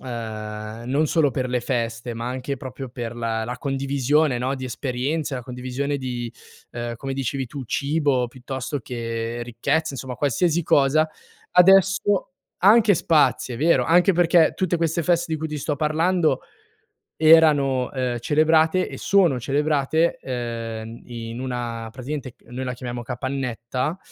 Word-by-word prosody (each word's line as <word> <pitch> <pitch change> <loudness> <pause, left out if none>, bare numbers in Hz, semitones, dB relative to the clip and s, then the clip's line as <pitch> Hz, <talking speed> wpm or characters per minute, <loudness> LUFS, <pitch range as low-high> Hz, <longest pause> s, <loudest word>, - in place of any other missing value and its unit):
ehm, 110 -2 -6
non 145 +4 +2
solo 155 -2 +2
per 130 0 -2
le 125 0 0
feste, 120 -1 -2
ma 115 +1 -5
anche 130 +2 -4
proprio 130 +1 -7
per 120 -1 -5
la 115 -1 -2
la 125 +2 -4
condivisione, 140 +1 +1
no, 130 +2 -1
di 130 - -6
esperienze, 135 +4 -2
la 125 - -6
condivisione 130 +3 -3
di, 120 -3 -4 0.4
uhm, 120 -1 -4
come 135 +2 -5
dicevi 135 0 -2
tu 135 +2 -7
cibo 140 -1 +1
piuttosto 130 +3 -5
che 115 0 -4
ricchezza, 120 +7 0
insomma 130 -1 -5
qualsiasi 160 +5 +1
cosa; 145 +3 +3 0.4
adesso 190 +2 +4 0.3
anche 210 +2 +6
spazi, 155 -6 +2
è - - -7
vero, 165 +4 +3
anche 175 +4 +4
perché 170 -1 +4
tutte 185 -2 0
queste 165 0 0
feste 170 0 +1
di 160 - -1
cui 160 - -3
ti 150 - -4
sto 145 +1 -2
parlando 155 0 +1 0.8
erano, 150 -5 +5
ehm, 125 -2 -2
celebrate 160 +6 +3
e - - -7
sono 180 -10 +3
celebrate, 150 +4 +1
uhm, 115 -2 -5
in 115 -1 -7
una 120 -3 -4
praticamente 130 +1 -6
noi 130 +2 -5
la 125 - -2
chiamiamo 120 -1 -6
capannetta, 125 +3 -3
130 Hz, 145 wpm, -23 LUFS, 120-155 Hz, 0.8 s, anche